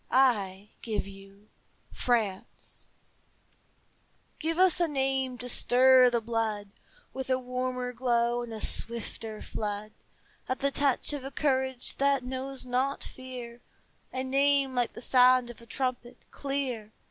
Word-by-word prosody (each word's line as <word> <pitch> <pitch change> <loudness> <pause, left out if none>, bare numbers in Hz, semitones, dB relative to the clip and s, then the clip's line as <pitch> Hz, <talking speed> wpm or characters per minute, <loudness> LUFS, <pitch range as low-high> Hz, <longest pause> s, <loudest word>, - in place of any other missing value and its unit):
I 210 -7 +2
give 215 -3 -3
you 195 +1 -14 0.4
France! 220 -6 -2 1.5
Give 325 +1 -1
us 370 -1 +5
a 345 - +3
name 265 -3 -1
to 245 - -5
stir 255 +1 +6
the 240 -1 +1
blood 220 -3 -2 0.4
With 265 0 -5
a 260 - +3
warmer 250 0 -3
glow 240 -1 +1
and 240 -1 -7
a 220 - -6
swifter 225 -1 +1
flood, 210 0 -4 0.6
At 255 - 0
the 280 0 0
touch 280 0 +2
of 285 -3 -5
a 270 - -5
courage 265 -3 0
that 275 -1 +2
knows 260 +1 -4
not 255 +3 -1
fear, 245 -2 -9 0.5
A 260 - -3
name 275 0 +2
like 245 -2 0
the 235 - -8
sound 250 -1 +5
of 235 - -15
a 235 - -15
trumpet, 255 -2 -4
clear. 265 -6 -3
250 Hz, 135 wpm, -28 LUFS, 235-265 Hz, 1.5 s, stir